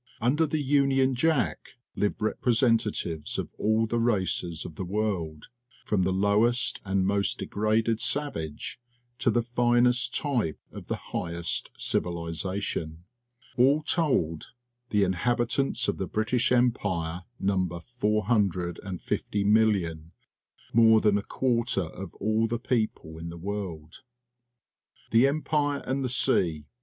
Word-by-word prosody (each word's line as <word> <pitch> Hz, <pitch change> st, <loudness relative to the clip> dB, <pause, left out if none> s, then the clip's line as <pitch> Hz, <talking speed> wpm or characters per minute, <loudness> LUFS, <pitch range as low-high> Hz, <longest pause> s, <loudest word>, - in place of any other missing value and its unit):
Under 140 Hz, +7 st, +2 dB
the 155 Hz, +1 st, -1 dB
Union 135 Hz, -1 st, +3 dB
Jack 135 Hz, -2 st, 0 dB, 0.2 s
live 105 Hz, -, 0 dB
repre 115 Hz, +2 st, 0 dB
sentatives 110 Hz, -, +1 dB
of -, -, -3 dB
all 110 Hz, +1 st, +2 dB
the 115 Hz, +1 st, -1 dB
races 95 Hz, -7 st, 0 dB
of 85 Hz, -, -7 dB
the 95 Hz, -, -5 dB
world, 90 Hz, -6 st, -3 dB, 0.4 s
from 105 Hz, -3 st, +1 dB
the 95 Hz, +1 st, +1 dB
lowest 105 Hz, +6 st, +2 dB
and 95 Hz, -1 st, 0 dB
most 100 Hz, 0 st, +1 dB
degraded 110 Hz, +2 st, 0 dB
savage 120 Hz, -, -2 dB, 0.4 s
to -, -, +2 dB
the 120 Hz, -, +2 dB
finest 120 Hz, +1 st, +2 dB
type 120 Hz, -, -1 dB
of -, -, -10 dB
the -, -, -1 dB
highest 85 Hz, -1 st, -3 dB
civilization. 85 Hz, -1 st, -2 dB, 0.5 s
All 140 Hz, +5 st, +4 dB
told, 105 Hz, -, 0 dB, 0.4 s
the 105 Hz, -1 st, +2 dB
inhabitants 120 Hz, +8 st, 0 dB
of -, -, -1 dB
the -, -, -2 dB
British 115 Hz, +4 st, 0 dB
Em 125 Hz, 0 st, +4 dB
pire 85 Hz, -5 st, -3 dB, 0.2 s
number 95 Hz, -3 st, 0 dB
450,000,000 100 Hz, -3 st, 0 dB, 0.3 s
— -, -, -31 dB
more 110 Hz, -1 st, +6 dB
than 105 Hz, -2 st, +3 dB
a -, -, -7 dB
quarter 120 Hz, -6 st, 0 dB
of 85 Hz, +2 st, -9 dB
all 110 Hz, +2 st, +1 dB
the 120 Hz, +1 st, -2 dB
people 110 Hz, -9 st, -2 dB
in 85 Hz, +1 st, -6 dB
the 85 Hz, -, -8 dB
world. 85 Hz, -4 st, -6 dB, 1.1 s
The 115 Hz, +4 st, +5 dB
Empire 145 Hz, 0 st, 0 dB
and 135 Hz, +2 st, -1 dB
the 130 Hz, -, -1 dB
Sea. 85 Hz, -, +2 dB
105 Hz, 125 wpm, -27 LUFS, 90-120 Hz, 1.1 s, more